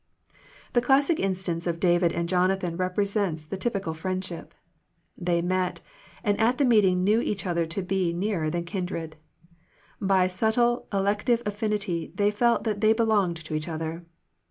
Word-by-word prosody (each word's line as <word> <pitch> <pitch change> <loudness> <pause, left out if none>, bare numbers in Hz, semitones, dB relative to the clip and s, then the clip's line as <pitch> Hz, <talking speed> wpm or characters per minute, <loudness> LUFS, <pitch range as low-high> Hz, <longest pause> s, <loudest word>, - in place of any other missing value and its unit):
The 240 - +4
classic 280 +5 +3
instance 180 -3 -1
of 170 -1 -1
David 175 -1 +3
and 170 0 -2
Jona 185 +2 +2
than 175 -3 -4
represents 185 -2 -1
the 175 - -5
typical 195 -4 -2
friendship. 185 +1 -5 0.6
They 175 -2 0
met, 185 0 -1 0.4
and 205 -2 +1
at 230 +3 +3
the 285 - +3
meeting 195 -7 +4
knew 215 +4 +3
each 200 -4 -2
other 170 -2 0
to 175 +4 -3
be 185 -1 0
nearer 175 -3 -1
than 170 +1 -2
kindred. 170 -3 -4 0.9
By 190 -2 +3
subtle 225 +6 +1
elective 210 +4 +1
affinity 205 -5 -2
they 205 +1 +2
felt 235 +3 +2
that 210 -3 -2
they 220 0 +5
belonged 215 -6 +1
to 160 - -6
each 155 +2 -2
other. 165 +1 -4
190 Hz, 155 wpm, -26 LUFS, 170-210 Hz, 0.9 s, they